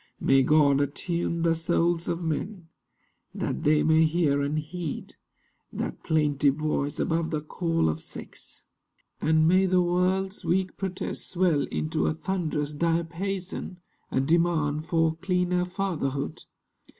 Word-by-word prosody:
(May 135 0 +4
God 140 0 +4
attune 170 +3 -1
The 165 -1 +3
souls 170 +1 +1
of 170 +1 -2
men, 165 +2 -4 0.7
that - - -2
they 150 0 +4
may 160 0 +4
hear 155 -3 +2
and 145 +2 -1
heed 160 +1 -5 0.6
That - - -4
plaintive 150 -3 +2
voice 150 -2 -1
above 165 0 0
the 155 - -1
call 165 - -1
of 80 0 -1
sex; - - -9 0.6
And 155 0 +3
may 185 +2 +4
the 180 -1 +3
world's 185 +2 0
weak 185 +2 0
protest 190 -2 -3
swell 175 -6 +2
into 75 0 -1
A 75 - 0
thunderous 155 -6 -2
diapason—a 170 -1 -3
demand 155 -1 +1
For 160 -1 +1
cleaner 180 0 0
fatherhood.) 170 -8 -3
165 Hz, 125 wpm, -27 LUFS, 150-180 Hz, 0.7 s, May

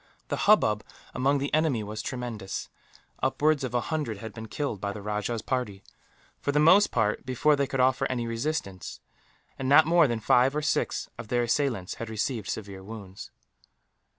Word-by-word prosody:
The - - 0
hubbub 105 - +4 0.3
among 140 +2 +2
the 140 +1 -3
enemy 155 -8 +2
was 105 +1 -5
tremendous. 120 -7 -5 0.5
Upwards 150 -1 +2
of 125 -1 -3
a 120 - +2
hundred 150 -9 -3
had 110 +1 -8
been 110 -1 -8
killed, 110 -5 -3
by 100 0 -2
the 105 - -8
rajah's 105 +2 -2
party 105 -7 -3 0.6
for 145 - -1
the 145 - 0
most 185 +7 +6
part 110 -3 0
before 130 +4 +2
they 140 -1 0
could 135 -1 -3
offer 130 0 +3
any 120 -2 -1
resistance 115 - -3 0.6
and 130 -1 -2
not 145 +2 +7
more 170 -1 +5
than 120 -2 -1
five 125 +5 +3
or 150 - -1
six 150 - 0
of - - -7
their 120 +2 +1
assailants 120 -6 0
had 115 - -4
received 110 -1 -2
severe 100 -3 -5
wounds. 100 -2 -9
120 Hz, 180 wpm, -27 LUFS, 105-145 Hz, 0.6 s, not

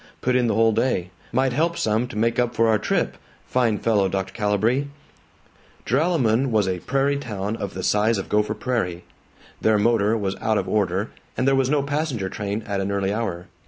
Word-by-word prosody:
Put 125 0 +1
in 125 -1 +3
the 110 - +1
whole 115 +1 +4
day. 110 -6 0 0.2
Might 130 +1 +1
help 165 +5 +1
some 110 +3 +1
to 110 - -8
make 115 +2 +1
up 120 -1 0
for 115 - +3
our 110 -2 +3
trip. - - -1 0.3
Fine 120 -4 +1
fellow, 105 -4 +2
Dr. 95 0 -3
Calibree." 110 +6 +1 1.0
Joralemon 135 -4 +2
was 105 -4 +2
a 90 -1 -1
prairie 140 +7 0
town 105 -4 -4
of 100 -4 -5
the 95 - -4
size 105 +3 +2
of 95 - -4
Gopher 105 0 +1
Prairie. 105 -7 -2 0.6
Their 110 -1 +3
motor 110 0 +2
was 95 -2 -2
out 110 -1 0
of - - -1
order, 100 0 0 0.3
and 130 - +1
there 135 - +4
was 135 -1 +2
no 145 -1 +2
passenger 140 -8 -2
train 105 +2 -4
at 100 -2 -2
an 95 +1 -2
early 100 0 0
hour. 95 -6 -3
110 Hz, 195 wpm, -23 LUFS, 100-125 Hz, 1.0 s, whole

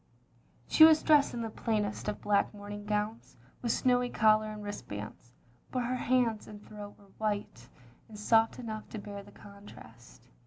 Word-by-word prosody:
She 315 - +6
was 315 -1 +7
dressed 295 -4 +4
in 235 - -3
the 225 - -4
plainest 210 -3 -2
of 210 - -3
black 205 0 +1
mourn 205 0 -8
ing 205 0 -8
gowns, 210 +2 -3 0.2
with 235 - 0
snowy 250 0 +2
collar 215 -1 +3
and 210 -1 -8
wristbands; 110 - -7 0.4
but 250 -1 -2
her 245 +1 -2
hands 245 -4 +1
and 205 -1 -11
throat 205 -1 -10
were 200 -1 -21
white 205 - -3 0.4
and 215 - -10
soft 225 +2 +3
enough 220 -3 -6
to - - -7
bear 205 -1 -7
the 205 +1 -16
contrast. 125 - -15
210 Hz, 170 wpm, -31 LUFS, 205-230 Hz, 0.4 s, was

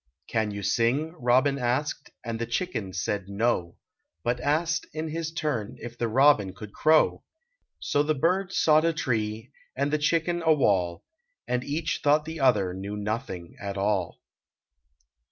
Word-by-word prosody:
" 75 +4 -53
Can 110 -2 0
you 100 0 -5
sing?" 120 +10 +1
robin 130 +3 +3
asked, 130 +4 -1 0.2
and 115 -1 -3
the 115 - -2
chicken 115 - -2
said, 95 +2 -3
"No," 100 -5 0 0.5
But 120 +1 0
asked 155 +4 0
in 155 +1 -3
his 160 0 -3
turn 125 -9 -2
if 120 0 -8
the 120 0 -1
robin 115 -5 +4
could 105 -2 -10
crow. 155 0 +3 0.6
So 145 - +1
the 155 +1 +1
bird 180 +6 +1
sought 155 -4 +4
a 165 0 +2
tree 110 -5 -2 0.2
and 140 +2 -1
the 155 - +2
chicken 170 +3 +1
a 160 -1 +5
wall. 95 - +1 0.4
And 125 0 0
each 155 +4 -2
thought 150 +1 +3
the 160 0 -6
other 105 -9 +3
knew 100 +2 -5
nothing 105 -5 -4
at 100 0 -4
all. 100 -3 0
125 Hz, 160 wpm, -27 LUFS, 105-155 Hz, 0.6 s, a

